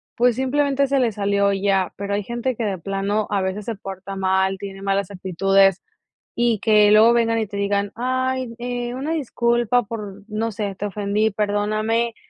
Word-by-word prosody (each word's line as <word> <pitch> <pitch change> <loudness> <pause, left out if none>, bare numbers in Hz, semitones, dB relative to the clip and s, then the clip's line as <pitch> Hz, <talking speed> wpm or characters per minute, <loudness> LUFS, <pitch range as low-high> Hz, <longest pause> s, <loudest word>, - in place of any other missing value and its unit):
pues, 245 -1 +3
simplemente 280 +2 +1
se 275 0 +1
le 240 -3 +2
salió 200 -1 +1
y 195 0 -3
ya, 195 -2 +2
pero 200 0 -3
hay 205 0 -1
gente 240 +4 -2
que 230 - -3
de 200 -3 -1
plano 195 +4 -2
a 200 -1 +1
veces 190 +2 -3
se 230 - -3
porta 195 0 -8
mal, 190 0 +1
tiene 195 0 -8
malas 195 -1 0
actitudes 195 0 +2 0.5
y 235 -2 +1
que 210 -1 +5
luego 220 +2 +7
vengan 230 -1 +2
y 220 - -1
te 200 0 -7
digan: 200 0 0
"ay, 255 0 -1
eh, 245 0 -4
una 275 +5 -3
disculpa 240 -4 +1
por, 205 -2 -7
no 225 +1 -2
sé, 205 -1 -3
te 200 - -4
ofendí, 205 +2 0
perdóname", 215 +3 0
210 Hz, 185 wpm, -22 LUFS, 195-235 Hz, 0.5 s, luego